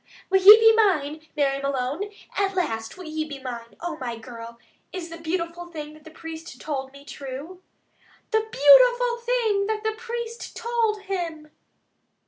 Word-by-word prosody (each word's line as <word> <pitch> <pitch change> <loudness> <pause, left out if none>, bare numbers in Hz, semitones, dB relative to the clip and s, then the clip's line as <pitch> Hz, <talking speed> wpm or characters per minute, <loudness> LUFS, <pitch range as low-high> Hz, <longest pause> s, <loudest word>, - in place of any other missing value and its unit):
Will 385 0 +4
ye 415 +3 +11
be 450 0 +7
mine, 315 -8 +1
Mary 275 -1 +1
Malone? 275 +8 -2 0.3
At 395 -1 0
last 225 -11 -2
will 365 - -9
you 310 0 -3
be 285 -2 -7
mine? 240 -3 -8
Oh, 340 -2 -4
my 240 -4 -5
girl, 230 0 -10 0.3
is 350 -3 -6
the 330 0 -9
beautiful 335 +1 -3
thing 305 -3 -8
that 310 0 -17
the - - -10
priest 325 +1 -9
told 270 -3 -4
me 280 +1 -15
true?" 285 +7 -8 0.7
"THE 440 - +4
BEAUTIFUL 480 - +5
THING 470 -4 0
THAT 435 0 -2
THE 440 0 0
PRIEST 470 0 -6
TOLD 455 -3 0
HIM!" 335 -6 -4
330 Hz, 160 wpm, -24 LUFS, 280-425 Hz, 0.7 s, ye